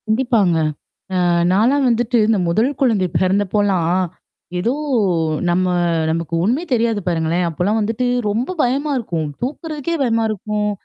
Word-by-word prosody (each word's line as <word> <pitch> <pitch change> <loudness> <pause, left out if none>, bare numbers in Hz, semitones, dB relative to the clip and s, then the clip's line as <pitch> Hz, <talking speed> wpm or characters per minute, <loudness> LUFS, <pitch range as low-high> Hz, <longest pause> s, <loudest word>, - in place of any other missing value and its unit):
கண்டிப்பாங்க. 220 -6 +2 0.6
அ - - +2 0.3
நாலாம் 255 +8 +3
வந்துட்டு 240 +1 +1
இந்த 220 -1 +3
முதல் 220 +9 +2
குழந்தை 220 -8 +2
பிறந்தப்போலாம், 190 -2 +1 0.7
ஏதோ 230 +8 0 0.8
நம்ம 180 +2 +2 0.5
நமக்கு 165 0 -3
ஒண்ணுமே 250 - +1
தெரியாது 230 -3 +1
பாருங்களேன். 170 +1 0
அப்போலாம் 185 +7 0
வந்துட்டு 225 +4 -1 0.2
ரொம்ப 240 - -2
பயமா 275 +4 0
இருக்கும். 165 -9 -3
தூக்குறதுக்கே 305 +4 -3
பயமா 230 -2 +1
இருக்கும். 210 0 -2
215 Hz, 120 wpm, -19 LUFS, 185-245 Hz, 0.8 s, நாலாம்